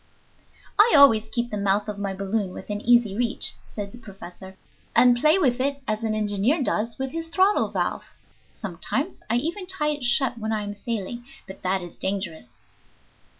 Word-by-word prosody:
"I 435 -1 +7
always 225 -6 +6
keep 240 +1 -2
the 210 - -2
mouth 200 +1 +1
of 210 -1 -5
my 200 -1 -2
balloon 195 0 -2
within 205 0 -5
easy 235 -4 +4
reach," 235 0 -1
said 205 -2 -6
the 245 - -12
professor, 190 -3 -11 0.4
"and 245 -1 +6
play 305 +8 +4
with 260 -9 +2
it 280 +2 0
as 215 +1 -2
an 220 -1 0
engineer 215 - +1
does 230 -1 -1
with 265 -1 -3
his 330 +1 -5
throttle 380 +5 +2
valve. - - -3 0.4
Sometimes 225 - -4
I 235 - +2
even 340 +9 -2
tie 330 -6 0
it 295 -3 -3
shut 245 0 +2
when 220 0 -3
I 215 -1 -1
am 205 0 -5
sailing, 230 +2 -4 0.2
but 190 - -11
that 185 0 0
is 175 - -10
dangerous." 170 - -5
220 Hz, 180 wpm, -24 LUFS, 200-265 Hz, 0.4 s, I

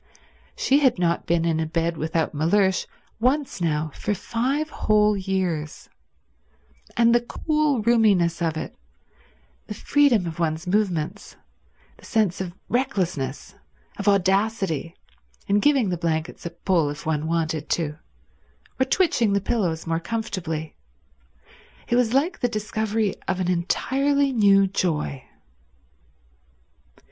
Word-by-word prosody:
She 275 +2 +3
had 260 -7 +3
not 170 -1 0
been 170 0 +2
in 165 -1 +1
a 160 - -1
bed 165 +1 -1
without 160 +1 -1
Mellersh 185 +5 +2 0.3
once 260 -3 0
now 155 -2 0
for 210 - -2
five 265 - -2
whole 210 0 +2
years; 185 -6 -3 1.1
and 235 0 +5
the 240 - +4
cool 300 -1 0
roominess 205 -8 +3
of 160 -2 0
it, 155 - -6 0.9
the - - -6
freedom 275 -10 +3
of 165 -1 -6
one's 160 0 -1
movements, 180 -5 -1 0.6
the - - -17
sense 210 -6 0
of 180 -2 -5
recklessness, 180 - -2 0.4
of 200 - -5
audacity, 195 -4 +1 0.5
in 200 +1 +3
giving 270 -4 +3
the 175 - -1
blankets 165 0 -2
a - - -4
pull 170 -2 0
if 145 0 -7
one 155 -1 -1
wanted 160 -2 -1
to, 155 -2 -1 0.8
or 260 - +3
twitching 260 - +2
the 200 - +3
pillows 185 -6 -1
more 165 0 -1
comfortably! 170 -6 -4 1.1
It 240 - +1
was 245 -2 +2
like 295 +8 +1
the 245 - +1
discovery 215 -1 -1
of 190 -1 -1
an 180 -1 0
entirely 275 +10 +1
new 200 -4 +5
joy. 155 -8 -2
190 Hz, 130 wpm, -24 LUFS, 165-230 Hz, 1.1 s, and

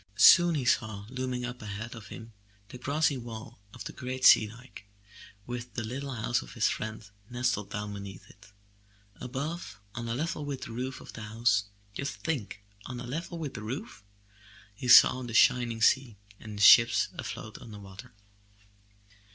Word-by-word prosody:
Soon 170 - +8
he 135 -4 -2
saw 110 -4 0
looming 130 -1 -3
up 125 0 -7
ahead 110 +2 -6
of 110 -4 -10
him 115 +4 -10 0.4
the 125 - -10
grassy 145 +2 +1
wall 115 -4 -9
of - - -9
the - - -7
great 130 0 -4
sea 110 - +8
dike, 115 -2 -13 0.6
with 120 0 -7
the 120 - -2
little 135 +5 -5
house 120 +1 0
of - - -12
his - - +2
friend 110 -1 -4 0.2
nestled 120 -4 -1
down 105 0 -5
beneath 100 -2 -9
it. 100 +1 -19 0.7
Above, 135 - -5
on 120 -1 -5
a 115 - -1
level 155 +2 -3
with 140 -2 -5
the - - -7
roof 130 +3 -5
of - - -12
the 110 - -8
house 110 -1 +1
— 100 0 -32
^just 140 +3 -3
think, 120 -10 -4 0.2
on 125 -1 -6
a 120 - -6
level 165 +7 -5
with 155 -4 -5
the - - -7
roof 110 -3 -6 0.4
— - - -26 0.3
he 115 +5 -7
saw 130 +1 +8
the 120 -3 -6
shining 115 -2 +3
sea 125 -3 +3 0.2
and 105 -2 -9
the 100 - 0
ships 115 +3 +7
afloat - - -6
on - - -12
the 105 - -9
water. 100 +4 -12
120 Hz, 185 wpm, -29 LUFS, 105-130 Hz, 0.7 s, Soon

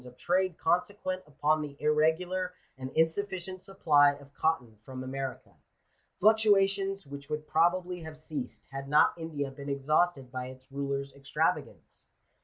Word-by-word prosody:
of 125 0 -14
trade 185 0 +1
consequent 185 +2 0
upon 150 +1 +1
the 145 -2 -6
irregular 170 +5 +1 0.2
and 130 0 -6
insufficient 185 +2 0
supply 150 -7 +4
of 140 0 -15
cotton 130 -10 0
from 130 +1 -7
America 135 0 -5 0.4
— - - -43
fluctuations 195 -2 +3
which 140 +1 -9
would 150 0 -3
probably 175 +2 +2
have 160 -1 -9
ceased, 150 -4 -6
had 135 0 -6
not 150 - +5
India 150 -4 -4
been 140 +1 -8
exhausted 140 0 +1
by 130 -1 -4
its 130 +1 -13
rulers' 140 0 -3
extravagance. 140 0 -2
155 Hz, 140 wpm, -30 LUFS, 140-180 Hz, 0.4 s, not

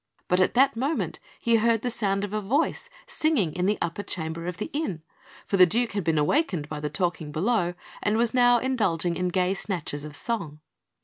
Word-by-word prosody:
But 180 - +2
at 185 - +2
that 270 +1 +4
moment 275 +7 -2 0.2
he 230 -1 +3
heard 225 0 +2
the 245 - -1
sound 200 -3 0
of 205 0 -4
a 215 - -1
voice 285 - 0 0.2
singing 255 - 0
in 180 +1 0
the 210 - +2
upper 170 +4 -3
chamber 165 -3 -4
of 180 -2 -4
the 210 - -5
inn; 200 - -3 0.4
for 195 - 0
the 180 -1 +8
Duke 235 +6 0
had 200 -2 -2
been 165 -1 +1
awakened 165 - +1
by 150 0 -5
the 150 0 -3
talking 160 -1 -2
below, 180 +1 0 0.3
and 210 +1 +1
was 230 -1 +1
now 245 -1 +5
indulging 210 -10 0
in 180 +1 -1
gay 180 +1 +1
snatches 170 -7 -3
of 150 -1 -8
song. 165 -6 -3
195 Hz, 205 wpm, -26 LUFS, 170-235 Hz, 0.4 s, the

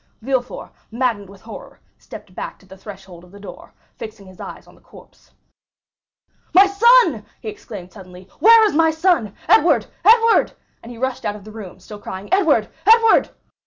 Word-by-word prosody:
Villefort, 255 -1 -4 0.2
maddened 225 -5 -2
with 195 -1 -16
horror, 225 - -12 0.2
stepped - - -13
back - - -8
to - - -24
the 190 0 -15
threshhold 190 -3 -13
of 180 - -18
the 200 - -15
door, 200 - -13 0.3
fixing 215 -2 -10
his 185 -1 -17
eyes - - -10
on - - -20
the - - -24
corpse. - - -20 1.3
"My 385 +2 +7
son!" 400 - +3 0.2
he 220 - -7
exclaimed 200 -3 -11
suddenly, 185 -2 -14
"where 450 +5 +6
is 420 - -1
my 320 +1 +3
son?—Edward, 320 - +1 0.2
Edward!" 455 0 +4 0.3
and 235 - -12
he 240 - -11
rushed 260 +1 -4
out 205 - -3
of 210 - -13
the 215 - -13
room, 210 -4 -11
still 205 +3 -12
crying, 190 0 -9
"Edward, 315 - +2 0.2
Edward!" 455 0 +4
225 Hz, 170 wpm, -19 LUFS, -, 1.3 s, My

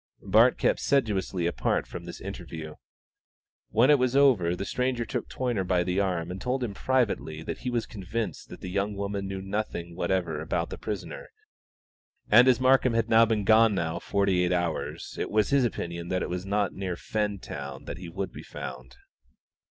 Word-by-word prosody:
Bart 110 +5 +5
kept - - +2
sedulously 100 -9 +1
apart 85 - 0
from - - -8
this - - -8
interview. 80 -1 -7 1.0
When 120 +6 +5
it 145 - +5
was 130 0 +1
over 115 -12 +4
the 100 - -4
stranger 125 +1 -1
took 125 -2 -4
Toyner 120 -6 -1
by 90 -1 +1
the 90 +2 0
arm 90 -4 -1
and 95 - -6
told 125 +1 -1
him 110 -4 -3
privately 105 -11 0
that - - -5
he 125 - -3
was 120 -2 -1
convinced 110 +1 -5
that - - -10
the 90 - -6
young 100 +2 -1
woman 100 0 -3
knew 95 0 -5
nothing 95 -4 -4
whatever 85 -3 -1
about 80 - -2
the - - -6
prisoner, - - -5 1.0
and 125 +1 +8
as 125 -2 +5
Markham 130 -2 +4
had 115 0 +1 0.2
been 110 -2 +1
gone 110 0 +5
now 80 -3 -1
forty 100 -3 +1
eight 90 - +1
hours 85 -3 -2
it - - -2
was 105 +3 +2
his 140 -1 +4
opinion 85 -6 -4
that 90 0 -1
it - - -4
was 90 +2 -4
not 100 -1 0
near 95 -2 -3
Fentown 100 -11 -4
that - - -6
he 90 -2 -7
would 95 +3 -4
be - - -8
found. 65 -1 -8
100 Hz, 185 wpm, -27 LUFS, 90-115 Hz, 1.0 s, and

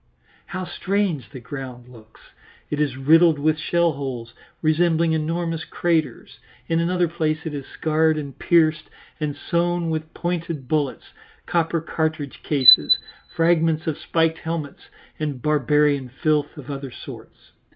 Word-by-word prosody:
How 185 0 -5
strange 180 - -2
the 130 - -9
ground 125 -1 -8
looks! 110 -3 -17 0.5
It 150 0 -1
is 140 -3 -1
riddled 160 +4 +5
with 155 +2 +1
shell 170 +1 +2
holes, 130 -5 -6 0.3
resembling 165 +1 +2
enormous 165 +1 -2
craters; 160 -7 -2 0.3
in 165 0 +1
another 175 +1 +1
place 160 -1 -2
it 160 - -4
is 140 -2 -6
scarred 160 0 +1
and 140 -3 -6
pierced 155 -3 +2 0.3
and 150 -2 -2
sown 170 +1 -1
with 160 0 -4
pointed 170 -5 -3
bullets, 145 -1 -2 0.3
copper 165 -1 0
cartridge 155 -3 -3
cases, 140 -4 +7 0.4
fragments 165 -1 +2
of 160 -3 -1
spiked 165 +1 0
helmets, 160 -3 -6 0.3
and 145 -5 -4
barbarian 150 -2 +2
filth 150 +4 -1
of 145 -1 -8
other 135 -1 -5
sorts. 120 - -12
155 Hz, 135 wpm, -22 LUFS, 140-165 Hz, 0.5 s, cases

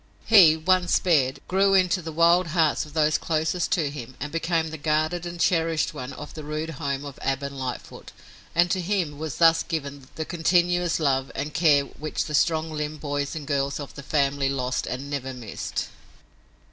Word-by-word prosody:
He, 175 -8 +7
once 180 +2 +2
spared, 140 -7 +2
grew 195 +1 +3
into 185 -1 +3
the 160 -1 -6
wild 170 +2 +4
hearts 160 -2 +1
of 150 - -15
those 155 -1 +2
closest 160 +2 -1
to 155 -5 0
him 130 -3 -8
and 145 +2 -5
became 165 -1 -1
the 160 - -7
guarded 155 +3 0
and 175 0 -7
cherished 165 -3 +1
one 140 -3 -6
of 150 +2 -9
the 155 - -8
rude 155 +2 -4
home 140 0 -2
of 140 -2 -9
Ab 135 0 -1
and 140 0 -5
Lightfoot, 130 -2 -6 0.4
and 175 +1 +3
to 185 - 0
him 175 -6 -2
was 155 -3 -5
thus 165 -1 +5
given 140 -5 -5
the 160 - -3
continuous 175 +1 +1
love 135 -3 0
and 145 +2 -4
care 150 -4 +4
which 150 +2 -4
the 150 - -6
strong 160 +1 +1
limbed 150 0 -4
boys 145 0 -3
and 155 -2 -6
girls 140 -1 -1
of 145 - -7
the 140 - -9
family 140 -1 0
lost 130 -2 -2
and 130 +3 -4
never 135 -2 -4
missed. 115 -5 -5
155 Hz, 190 wpm, -25 LUFS, 140-170 Hz, 0.4 s, He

